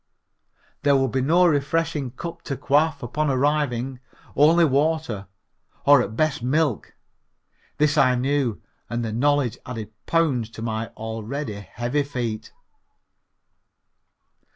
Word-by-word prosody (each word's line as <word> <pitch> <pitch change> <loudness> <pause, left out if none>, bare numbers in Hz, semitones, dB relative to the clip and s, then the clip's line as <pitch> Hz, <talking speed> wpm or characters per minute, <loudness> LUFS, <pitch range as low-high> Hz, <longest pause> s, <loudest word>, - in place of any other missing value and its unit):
There 145 0 +4
would 135 -2 +2
be 130 - 0
no 170 +7 +4
refreshing 150 -2 0
cup 170 +7 -7
to 135 - -3
quaff 145 +1 +1
upon 150 +5 -1
arriving, 135 -2 0 0.4
only 165 +4 +5
water, 145 - 0 0.6
or 145 -2 +7
at 110 -2 -4
best 155 -4 +1
milk. 140 0 0 0.8
This 150 0 +3
I 125 -2 +4
knew 130 -3 0 0.3
and 120 0 -2
the 110 - -3
knowledge 135 -1 +1
added 110 -4 -7
pounds 140 -9 +1
to 110 - -5
my 110 0 -2
already 110 +3 -4
heavy 120 +7 -2
feet. 120 -6 -4
135 Hz, 120 wpm, -23 LUFS, 120-150 Hz, 0.8 s, or